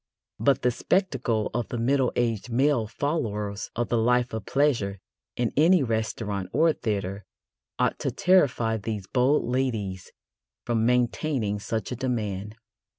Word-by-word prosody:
But 135 +5 +2
the 125 - +3
spectacle 125 - 0
of 120 -1 -1
the 120 - -4
middle 130 +2 +2
aged 115 -1 -1
male 130 -2 +2
followers 105 -6 -2
of 120 0 -1
the 120 - +2
life 125 +1 +2
of 110 -2 -5
pleasure 120 -9 +1 0.4
in 120 -2 -1
any 165 +2 +5
restaurant 110 -4 -2
or 160 +4 +4
theatre 100 -4 -3 0.5
ought - - +1
to - - -1
terrify 125 -11 +3
these 105 -1 -4
bold 130 +7 +2
ladies 115 -7 -2 0.5
from 115 -1 +1
maintaining 125 -3 0
such 110 +3 -3
a - - -2
demand. 105 -5 -3
115 Hz, 140 wpm, -26 LUFS, 105-130 Hz, 0.5 s, any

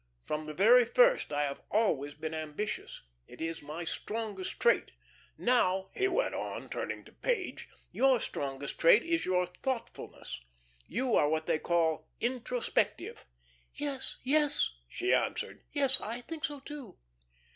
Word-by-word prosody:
From 155 0 -2
the 155 - -6
very 235 +7 +7
first - - +4
I 145 0 +1
have 140 -1 -3
always 145 -10 +1
been 160 +1 -5
ambitious. 155 +6 -4 0.2
It - - -13
is 165 0 -3
my 150 +4 -6
strongest 210 +1 -4
trait. 480 - +3 0.5
Now," 190 -6 +2
he 390 - +2
went 475 +7 +1
on, - - -4
turning - - -4
to - - -15
Page, 455 -7 -2 0.2
"your 265 -2 +4
strongest 140 -6 -4
trait 170 +7 +7
is 335 0 0
your 180 -1 +2
thoughtfulness. 230 - -5 0.5
You 255 -1 -1
are 145 - +4
what 160 0 0
they 155 - +1
call 160 -2 +1
introspective." 245 - -1 0.5
"Yes, 280 -2 -3
yes," 295 +2 +3 0.2
she 370 +2 0
answered. - - -1
"Yes, 275 -3 +3
I 235 +3 -4
think 315 +4 -4
so, 290 -2 -5
too." 285 -5 -9
225 Hz, 145 wpm, -31 LUFS, -, 0.5 s, very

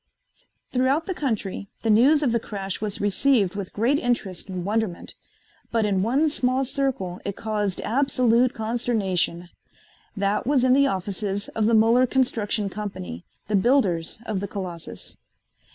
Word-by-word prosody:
Throughout 265 +5 +1
the 375 - -2
country 220 - -3 0.2
the 225 - +3
news 280 +8 +5
of 255 - +2
the 235 - +2
crash 195 -4 -5
was 215 0 -3
received 205 -1 +2
with 200 -2 -5
great 245 +7 +1
interest 205 -7 -2
and 180 -2 -4
wonderment, 210 -3 -2 0.6
but 225 -2 +2
in 195 -2 +1
one 265 +10 +2
small 265 -2 +1
circle 250 -10 -2
it 200 - -4
caused 210 -4 -2
absolute 250 -1 +2
consternation. 210 -7 -1 0.7
That 200 +3 0
was 275 -3 +3
in 255 0 +5
the 280 +1 +5
offices 200 0 -2
of 215 -1 0
the 230 - +4
Muller 230 +4 +5
Construction 225 -5 0
Company, 135 - -6 0.2
the 210 - 0
builders 195 -7 +2
of 215 -4 -2
the 200 - -4
Colossus. 180 -5 -7
215 Hz, 150 wpm, -24 LUFS, 195-250 Hz, 0.7 s, news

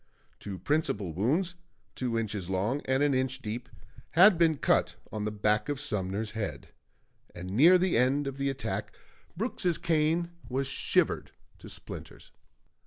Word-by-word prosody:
Two 100 -2 -6
principal 105 - -1
wounds, 150 - +1 0.4
two 120 -3 -1
inches 105 -5 -2
long 105 +9 0
and 130 +2 +2
an 145 -1 +3
inch 130 0 0
deep, 120 +1 -5 0.4
had 185 +5 +8
been 165 -2 +3
cut - - +2 0.2
on 105 -1 -3
the 105 - -1
back 105 +3 +1
of 145 -2 -2
Sumner's 105 -5 -2
head; 90 -11 -5 0.7
and 90 +1 -6
near 160 - +7
the 180 0 +1
end 130 +4 +2
of 135 0 -4
the 140 0 0
attack, 105 -6 -4 0.4
Brooks's 185 -5 0
cane 165 +1 +1 0.2
was 135 +2 -1
shivered - - +1 0.3
to - - -11
splinters. - - -9
130 Hz, 150 wpm, -29 LUFS, 105-150 Hz, 0.7 s, had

